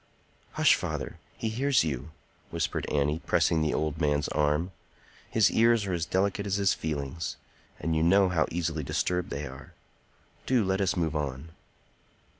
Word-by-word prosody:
"Hush, - - +5
father! - - -3 0.2
He 115 - -2
hears 130 +3 +2
you!" 75 -1 -3 0.4
whispered 80 -3 -2
Annie, 75 +2 +1
pressing 80 - +3
the 75 -1 +1
old 80 +1 -2
man's 75 -1 +1
arm. 75 +4 +1 0.6
"His - - +4
ears 115 -1 +4
are 95 - -2
as 85 -1 -1
delicate 100 +2 0
as 100 - 0
his 100 -1 +3
feelings; 75 0 -4 0.4
and 80 +1 -1
you 80 - +2
know 95 +4 +5
how 85 -3 +1
easily 80 -2 -2
disturbed 90 +5 -1
they 70 +1 -4
are. 70 +1 -10 0.7
Do 125 -5 +3
let 95 +1 0
us 95 -1 +1
move 80 -3 0
on." 70 0 -3
80 Hz, 160 wpm, -28 LUFS, 75-95 Hz, 0.7 s, Hush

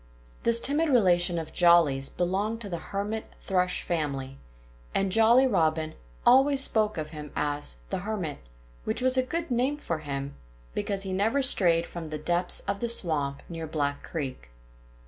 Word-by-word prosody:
This 235 0 +4
timid 295 +6 +1
relation 180 -8 +3
of 160 -1 -5
Jolly's 165 -6 +4
belonged 200 +6 -2
to 205 - -6
the 170 -2 -4
Hermit 205 +5 -4
Thrush 180 -1 0
family; 140 -5 -3 0.6
and 195 -1 +1
Jolly 225 +5 +5
Robin 160 -8 0 0.3
always 270 +2 +5
spoke 215 -5 0
of 155 -1 -4
him 150 -2 -8
as 145 - 0 0.2
"The - - -1
Hermit," 185 -7 -4 0.4
which - - -2
was 255 0 +3
a 260 - +4
good 330 +4 -4
name 255 +4 0
for 170 - -3
him, 140 -2 -5 0.4
because 195 - -1
he 190 -1 -3
never 225 +9 +1
strayed 170 -9 +5
from 170 -2 -7
the 155 0 -5
depths 175 +3 -1
of 200 0 -3
the 235 - -2
swamp 150 -10 -1
near 165 -2 -6
Black 145 -2 -2
Creek. 130 - -6
180 Hz, 165 wpm, -27 LUFS, 155-225 Hz, 0.6 s, Jolly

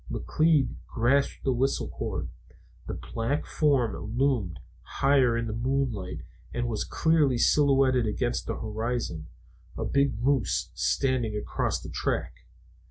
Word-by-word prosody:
McLeod 155 -3 +1
grasped 130 +4 +1
the 135 - +2
whistle 135 +3 0
cord. - - -4 0.6
The - - -3
black 115 +6 -2
form 140 -7 +1 0.2
loomed 120 - +1 0.2
higher 135 -4 +2
in 115 - -1
the 110 - -3
moonlight 120 -6 -2 0.3
and 120 0 -2
was 110 -3 -1
clearly 155 -6 +2
silhouetted 135 -3 +4
against 120 +3 -1
the 115 - -2
horizon 110 -7 -3 0.5
a - - -2
big 140 -6 +1
moose 130 0 +1
standing 130 -5 0
across 105 - -1
the - - -7
track. - - -2
125 Hz, 125 wpm, -27 LUFS, 115-140 Hz, 0.6 s, silhouetted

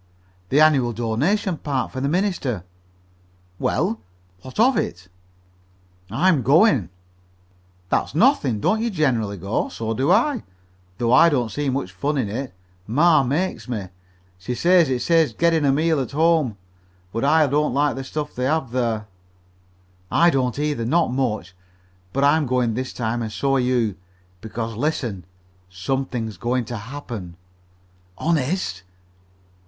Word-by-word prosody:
"The 140 - +3
annual 140 -6 +4
donation 145 - 0
party 135 -4 -2
for 130 - -4
the 140 - 0
minister." 165 - -1 1.0
"Well, 205 +8 0 0.4
what 130 - -10
of 250 +3 +5
it?" 90 +2 -3 1.0
"I'm 155 - +2
going." 135 - +4 1.0
"That's - - 0
nothing. 160 - +3
Don't 215 - +1
you 235 - 0
generally 120 - 0
go? 100 +4 -2
So 115 0 -3
do 130 +5 +1
I, 245 +2 +3 0.6
though 120 +2 +1
I 165 +6 +7
don't 125 -7 0
see 145 +6 -2
much 130 -8 -2
fun 145 +9 -2
in 120 -6 -1
it. 130 +5 -4 0.4
Ma 155 +7 +4
makes 145 +3 -2
me. 105 -7 -4 0.5
She 110 +8 -4
says 175 0 +4
it 125 -2 -1
saves 165 0 +3
gittin' 165 -3 +2
a 140 - +4
meal 155 +2 +2
at 135 0 -4
home, 155 -7 +2 0.6
but 115 - -2
I 155 +2 +4
don't 145 -1 0
like 145 -1 +2
the 135 - -5
stuff 150 +2 -5
they 125 - -2
have 145 -3 0
there." 115 -4 -1 1.0
"I 170 0 +4
don't 125 -4 0
either 145 -5 -1
not 145 +3 +1
much 110 -9 -2 0.6
but 135 +5 0
I'm 145 +1 +3
going 125 -2 +1
this 130 +3 -3
time 120 0 -2
and 110 -1 -4
so 135 +5 0
are - - +1
you. 120 -6 0 0.4
Because, 115 +1 -5
listen, 120 - -2 0.4
something's 115 +2 -3
going 120 +5 -1
to 120 +1 -5
happen." 115 -6 -7 0.8
"Honest?" 155 - -1
130 Hz, 145 wpm, -22 LUFS, 115-155 Hz, 1.0 s, I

